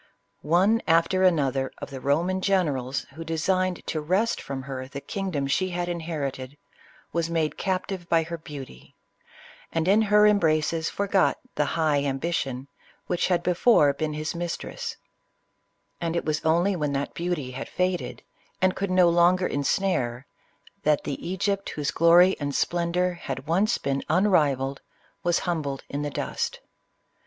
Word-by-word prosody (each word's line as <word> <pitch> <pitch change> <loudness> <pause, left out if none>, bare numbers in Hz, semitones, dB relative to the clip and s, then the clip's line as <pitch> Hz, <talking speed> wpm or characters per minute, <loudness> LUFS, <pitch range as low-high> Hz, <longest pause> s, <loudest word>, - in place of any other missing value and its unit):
One 190 - +3
after 165 +3 +3
another 140 -7 +2
of - - -8
the 135 -1 -7
Roman 170 +8 +1
generals 145 -10 0
who 165 - -7
designed 180 +3 0
to 155 - -2
wrest 190 +9 +1
from 135 -1 -5
her 130 -1 -6
the 140 +1 -7
kingdom 180 -4 -3
she 185 +7 0
had 175 0 -2
inherited, 145 -6 -4 0.6
was 170 -1 0
made 160 -2 0
captive 185 -1 -3
by 165 -1 +4
her 170 +1 -6
beauty, 140 - -10 0.8
and 165 +1 -1
in 205 +3 +5
her 210 0 +5
embraces 160 -5 +2
for 200 - -2
got 195 -1 +2 0.2
the 150 - +1
" - - -3
high 150 -3 +2
ambition" 135 -2 -2 0.4
which 180 - 0
had 175 -2 +1
before 175 -5 +4
been 155 +2 -3
his 155 +2 -3
mistress; 175 - -5 1.0
and 165 0 -1
it 170 - -1
was 155 0 -1
only 170 +5 +2
when 150 -4 -1
that 140 +1 -2
beauty 170 -7 -3
had 130 - -6
faded, 180 -1 -2 0.4
and 185 0 +2
could 200 0 -2
no 185 -1 +5
longer 175 +2 +4
ensnare, 140 -5 0 0.6
that 150 -1 +2
the 140 - -5
Egypt 195 +2 -1
whose 150 0 -2
glory 175 +3 +6
and 145 -1 -3
splendor 175 +1 0
had 135 -6 -6
once 195 +9 +2
been 140 0 -2
unrivalled, 140 -9 +2 0.4
was 175 0 +2
humbled 150 -6 -2
in 145 - -3
the 145 - -2
dust. 470 - -3
165 Hz, 155 wpm, -26 LUFS, 145-185 Hz, 1.0 s, glory